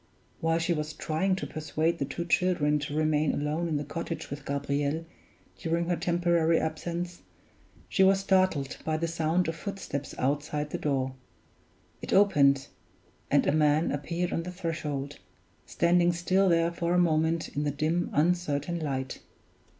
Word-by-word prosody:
While 165 0 +1
she 170 +1 +1
was 155 -1 -3
trying 170 +6 0
to 190 - -4
persuade 155 +2 -1
the 140 - 0
two 170 +5 -4
children 160 -4 +2
to 145 0 -4
remain 155 -1 +2
alone 150 +4 -1
in 155 -3 0
the 145 - -2
cottage 165 +2 -5
with 140 0 -7
Gabriel 140 +3 -1 0.5
during 170 +1 -1
her 175 - +2
temporary 170 -1 +2
absence, 170 +2 -4 0.7
she - - 0
was 195 0 +5
startled 185 -8 +1
by 155 -1 0
the 165 +1 -1
sound 165 +2 0
of 165 - -2
footsteps 165 -8 -5
outside 150 +2 -1
the - - -3
door. 135 -3 -1 0.9
It - - -4
opened, 140 -9 +4 0.6
and - - +3
a - - +3
man 150 +1 +3
appeared 170 +5 -2
on - - 0
the 180 +2 -6
threshold, 150 -6 -4 0.5
standing 175 0 +3
still 185 +3 +2
there 165 0 +3
for 170 +1 -1
a - - +4
moment 160 -1 +2
in 145 - -3
the 145 - +1
dim, 155 +5 0
uncertain 170 0 0
light. 135 -4 -3
160 Hz, 160 wpm, -28 LUFS, 150-175 Hz, 0.9 s, was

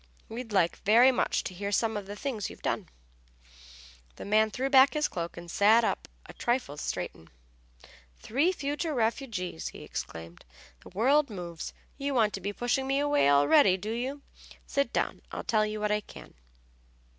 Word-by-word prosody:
We'd 230 0 -7
like 180 -4 +2
very 235 +5 +5
much 255 - 0
to - - -5
hear 200 +2 -4
some 220 +2 +1
of 205 -2 -5
the 205 - -6
things 220 -4 -3
you've - - -13
done." - - -2 1.3
The - - -8
man 215 +1 +3
threw 260 +5 -2
back 270 +1 +6
his 300 0 +2
cloak 170 -1 -5
and 170 - -8
sat 220 +5 +5
up - - -1 0.2
a - - -11
trifle 240 - -1
straighten 80 - -5 0.9
"Three 285 +11 +1
future 295 -1 -3
refugees!" 220 - -2
he - - -9
exclaimed. 85 +1 -7 0.4
"The - - -14
world 275 +9 +3
moves! 175 -5 -6 0.3
You 280 0 -2
want 220 -4 +3
to 195 - -5
be 200 +3 -2
pushing 245 +5 -1
me 270 0 +1
away 290 - +3
already, 180 - +5
do 205 +4 -5
you? 260 +5 -4 0.4
Sit 280 0 -1
down, - - -1
I'll - - -5
tell 215 -2 +2
you 215 0 -4
what 210 0 0
I 210 0 +1
can." - - -13
220 Hz, 175 wpm, -29 LUFS, 195-270 Hz, 1.3 s, back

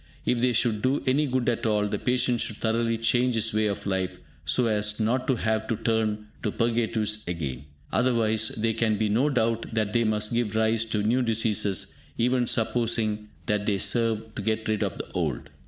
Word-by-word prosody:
If 125 - +1
they 125 +1 +2
should 110 -2 +1
do 130 +4 +1
any 145 +3 +2
good 130 -2 -1
at 120 0 0
all, 105 -1 +2
the - - -2
patient 125 -1 +1
should 110 - -2
thoroughly 115 0 0
change 120 +2 +2
his 110 0 +1
ways 110 0 +2
of 100 0 -4
life, 95 -2 -1 0.3
so 125 - +3
as 105 -1 +1
not 125 +4 0
to 130 - +3
have 110 -1 -1
to 115 - 0
turn 110 -1 -1 0.2
to 105 - -1
purgatives 110 -2 0
again; 70 -6 -4 0.3
otherwise, 110 -3 +2
there 110 +1 +1
can 110 -1 +1
be 110 0 0
no 125 +8 +2
doubt 115 -4 0
that 110 -2 0
they 120 -1 +3
must 105 0 0
give 115 -3 0
rise 110 0 +2
to 105 -2 -1
new 120 +5 +2
diseases, 110 -5 +1 0.2
even 125 +1 +2
supposing 110 -2 0 0.2
that 105 0 -1
they 100 -2 +2
serve 110 0 +1
to 105 - -5
get 110 +1 -1
rid 110 -1 0
of - - -2
the - - -5
old. - - -3
110 Hz, 200 wpm, -26 LUFS, 105-120 Hz, 0.3 s, so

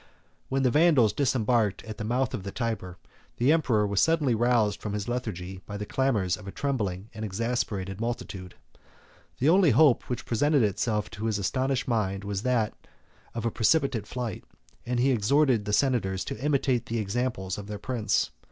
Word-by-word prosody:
When 135 0 0
the 125 - +3
Vandals 145 -9 +4
disembarked 120 -5 +1
at 110 0 -8
the - - -3
mouth 125 +5 0
of 125 - -3
the 100 +1 -6
Tyber, 110 -7 -3 0.4
the 125 +5 +3
emperor 125 -10 +2
was 100 -1 +1
suddenly 160 -6 +3
roused 115 -3 +2
from 105 - -4
his 105 +1 -3
lethargy 95 -7 -4
by 105 - -5
the 105 - -4
clamors 105 -9 0
of 105 - -12
a - - -5
trembling 105 -8 -3
and 110 0 -6
exasperated 100 -2 -2
multitude. 100 -6 -5 0.8
The 140 - +2
only 180 -1 +5
hope 140 +1 +4
which 125 - -3
presented 145 +3 +2
itself 105 +1 -1
to 110 -1 -5
his 110 -2 0
astonished 130 +6 -1
mind 100 -5 -1
was 100 -1 -3
that 120 -3 +1 0.6
of 115 -1 -3
a 115 - +1
precipitate 125 -3 +1
flight, 120 -4 -4 0.4
and 125 0 0
he 135 +2 +3
exhorted 125 0 +2
the 105 - -2
senators 105 -7 +1
to 115 - -6
imitate 135 -4 +1
the 115 - -2
example 110 -2 -2
of 100 -1 -8
their 105 0 -5
prince. 115 -1 -1
115 Hz, 180 wpm, -27 LUFS, 105-130 Hz, 0.8 s, only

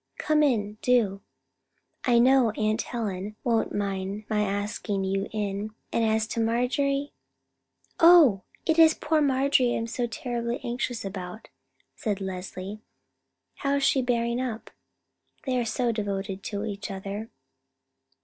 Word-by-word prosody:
Come 305 0 +2
in, 215 -7 +1
do. 220 -6 +2 0.8
I 245 -2 +4
know 255 0 +5
Aunt 215 +1 +1
Helen 210 -3 -4
won't 230 -2 +1
mind 200 0 -3
my 210 -1 +2
asking 205 0 -2
you 195 +1 -1
in, 210 0 -3 0.2
and 230 - +2
as 220 0 +2
to 230 - -3
Marjorie——" 260 +5 0 0.9
"Oh! 325 - +7 0.2
it 320 0 +2
is 320 -1 +7
poor 310 0 +1
Marjorie 270 -3 +3
I - - 0
am 225 - -2
so 240 +1 -2
terribly 235 +1 -3
anxious 245 -2 -3
about," 190 +1 -7 0.5
said 205 -4 -2
Leslie. 190 +1 -6 0.8
"How 280 0 0
is 280 - 0
she 270 - +3
bearing 235 0 0
up? 235 -3 -5 0.7
They 255 -2 +1
are 240 - 0
so 240 +1 0
devoted 200 -3 -3
to 205 0 -3
each 205 0 -5
other." 200 +3 -5
225 Hz, 140 wpm, -27 LUFS, 200-250 Hz, 0.9 s, Oh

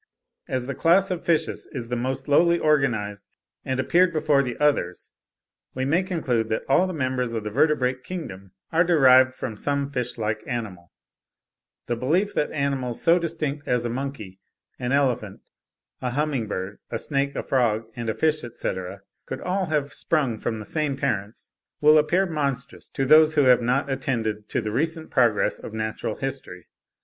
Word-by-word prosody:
As 130 -2 -2
the 140 - -3
class 185 +7 +3
of 180 -2 -3
fishes 165 -2 0
is 120 -4 -5
the 125 - -1
most 130 +2 -3
lowly 170 +4 +4
organised, 115 -10 0 0.4
and 130 0 -2
appeared 175 +7 +3
before 155 -3 +2
the 125 -3 -4
others, 140 -12 0 0.6
we 130 0 -1
may 160 +7 +2
conclude 135 - -1
that 110 - -1
all 180 +7 +4
the - - -3
members 130 -6 -1
of 110 -2 -3
the 105 - -4
vertebrate 130 -1 +1
kingdom 100 - -7 0.2
are 165 +1 +4
derived 130 -6 +5
from 115 -4 -5
some 140 +5 -2
fishlike 115 -4 -2
animal. 100 -8 -5 0.9
The 120 - -1
belief 170 - 0
that 150 - 0
animals 135 -5 -2
so 170 +2 +4
distinct 155 -4 -3
as 125 -1 +1
a - - -1
monkey, 120 -7 -5 0.4
an 125 0 -2
elephant, 125 -8 0 0.6
a 125 - -1
humming 135 -3 -1
bird, 95 0 -5
a 115 - -2
snake, 140 +2 -1
a - - -2
frog, 115 -4 +1
and 115 -1 -4
a 110 - -1
fish, 155 -1 +1
etc., 95 -6 -5 0.2
could - - -5
all 185 0 -1
have 150 -2 -1
sprung 135 -9 0
from 110 - -2
the 110 - -7
same 150 -1 -1
parents, 110 -6 -3 0.3
will 155 +1 +6
appear 170 +6 +2
monstrous 140 -6 -3
to 135 - -2
those 155 +2 +6
who 145 - +5
have 125 -2 +5
not 125 +4 +1
attended 110 -6 -2
to - - -1
the 105 - -3
recent 160 +6 -2
progress 120 -6 +2
of 110 - -8
natural 110 0 -3
history. 135 -10 -6
130 Hz, 175 wpm, -24 LUFS, 115-155 Hz, 0.9 s, will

